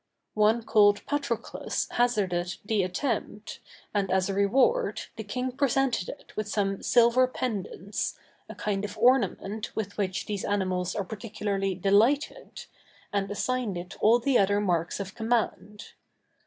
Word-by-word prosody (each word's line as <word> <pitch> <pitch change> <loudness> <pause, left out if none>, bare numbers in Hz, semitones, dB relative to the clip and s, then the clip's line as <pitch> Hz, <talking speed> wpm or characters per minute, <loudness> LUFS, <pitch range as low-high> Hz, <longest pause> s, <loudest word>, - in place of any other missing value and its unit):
One 215 +2 +3
called 205 -2 +4
Patroclus 280 -6 -2
hazarded 190 -8 0
the 215 -1 +1
attempt, 210 +2 -3 0.3
and 200 -2 0
as 190 +1 +1
a - - -1
reward, 260 - +2
the 220 - -6
king 250 +5 -3
presented 270 -5 +1
it - - -11
with 215 -1 -2
some 200 -2 -1
silver 240 +1 +4
pendants, 210 -5 -3 0.3
a - - -8
kind 200 -1 -2
of 205 +1 -5
ornament 235 -4 +1
with 205 -1 -4
which 190 -2 -1
these 205 -2 -3
animals 185 -2 -1
are 200 -3 -2
particularly 200 -2 -3
delighted, 225 - +1 0.5
and 200 -1 0
assigned 225 -1 -1
it 175 +1 -7
all 225 +3 +6
the 245 +1 +2
other 200 +1 +3
marks 175 -4 0
of 195 -1 -5
command. 220 -2 -2
210 Hz, 140 wpm, -27 LUFS, 195-240 Hz, 0.5 s, all